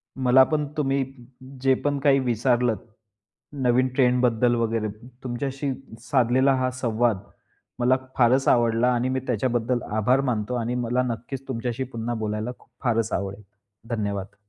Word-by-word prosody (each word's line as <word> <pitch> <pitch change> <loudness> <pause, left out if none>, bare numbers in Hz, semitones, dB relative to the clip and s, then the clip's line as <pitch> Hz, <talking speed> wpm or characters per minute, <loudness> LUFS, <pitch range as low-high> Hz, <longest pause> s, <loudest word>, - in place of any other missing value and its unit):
मला 130 0 +5
पण 150 +2 0
तुम्ही 135 -2 +1 0.6
जे 135 0 +4
पण 145 -1 +1
काही 140 -1 +4
विचारलत 120 -2 +1 0.9
नवीन 125 +1 +3
ट्रेंड 125 -2 +3
बद्दल 120 0 +3
वगैरे 115 -2 0 0.4
तुमच्याशी 135 +3 -3 0.3
साधलेला 130 +2 +3
हा 130 0 0
संवाद 120 -3 0 0.6
मला 125 +1 +4 0.2
फारचं 130 +2 +4
आवडला. 120 0 +3
आणि 125 +1 0
मी 130 0 0
त्याच्याबद्दल 120 0 0 0.2
आभार 125 +5 +3
मानतो 110 +2 -2
आणि 120 0 -2
मला 125 +1 0
नक्कीचं 125 +2 -5
तुमच्याशी 120 0 -3
पुन्हा 120 -2 -4
बोलायला 110 +1 -3
खूप - - -24
फारचं 115 -3 +1
आवडेल. 100 +1 -4 0.5
धन्यवाद. 100 -2 -3
125 Hz, 135 wpm, -24 LUFS, 115-130 Hz, 0.9 s, मला